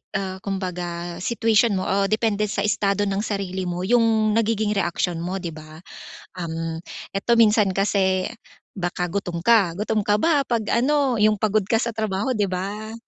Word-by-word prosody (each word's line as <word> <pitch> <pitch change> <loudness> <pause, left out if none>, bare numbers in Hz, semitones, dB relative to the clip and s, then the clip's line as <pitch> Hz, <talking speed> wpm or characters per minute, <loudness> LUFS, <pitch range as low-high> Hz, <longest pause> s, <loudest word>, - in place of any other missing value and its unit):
ah, 190 -1 -3
kumbaga 175 -3 -4
situation 225 +1 +2
mo 185 - -1
o 195 0 +1
depende 215 -1 +1
sa 200 0 -2
estado 205 -1 +1
ng 195 0 -1
sarili 190 -3 -3
mo 175 +1 -3
'yung 225 0 +3
nagiging 220 -1 +1
reaksyon 175 -3 -1
mo, 185 +2 -4
'di 170 - -3
ba? 155 +2 -12 0.6
Uhm, 165 -1 -4 0.3
eto 200 +4 +1
minsan 210 -4 +4
kasi 190 -2 +1 0.5
baka 175 -1 -2
gutom 180 -3 -3
ka. 200 -7 +4
Gutom 210 +1 -1
ka 205 - +3
ba 295 -5 +3
'pag 235 -2 0
ano, 265 0 +2
'yung 215 +1 +4
pagod 210 -1 0
ka 225 +2 +1
sa 235 - -1
trabaho, 215 +1 -2
di 210 -5 +1
ba? 200 +4 -4
200 Hz, 165 wpm, -23 LUFS, 185-220 Hz, 0.6 s, minsan